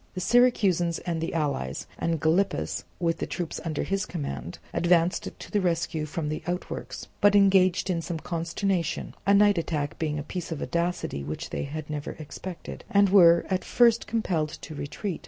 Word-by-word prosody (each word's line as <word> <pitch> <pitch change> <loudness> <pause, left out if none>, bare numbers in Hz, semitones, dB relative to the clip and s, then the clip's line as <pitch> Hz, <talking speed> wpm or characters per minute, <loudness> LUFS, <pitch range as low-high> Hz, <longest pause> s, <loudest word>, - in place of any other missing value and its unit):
The - - -2
Syracusans 195 -7 +3
and 165 -2 -2
the 165 - -3
allies, 140 - -2
and 165 -1 0
Gylippus 170 +6 +1
with 165 -2 0
the - - -2
troops 170 +1 -4
under 155 -3 -2
his 195 0 -1
command, 145 - -5 0.2
advanced 175 0 +2
to - - -11
the 205 - +2
rescue 165 -3 -1
from 155 0 -3
the 155 - -3
outworks, 180 +1 -4
but 205 0 +6
engaged 190 -3 +4
in 175 -3 0
some 170 0 -4
consternation 170 +2 -2
(a 200 - +6
night 205 -2 +5
attack 150 -3 -3
being 155 -2 -1
a 145 - -3
piece 175 +3 -6
of 160 - -3
audacity 170 - -2
which 75 +2 -5
they - - -2
had 150 +2 -6
never 150 -1 -4
expected), 165 +3 -8
and 200 -1 +4
were 170 -3 +7
at 185 -1 -1
first 235 -2 +3
compelled 180 -9 0
to 155 - -7
retreat. 160 +6 -4
170 Hz, 175 wpm, -27 LUFS, 155-190 Hz, 0.2 s, were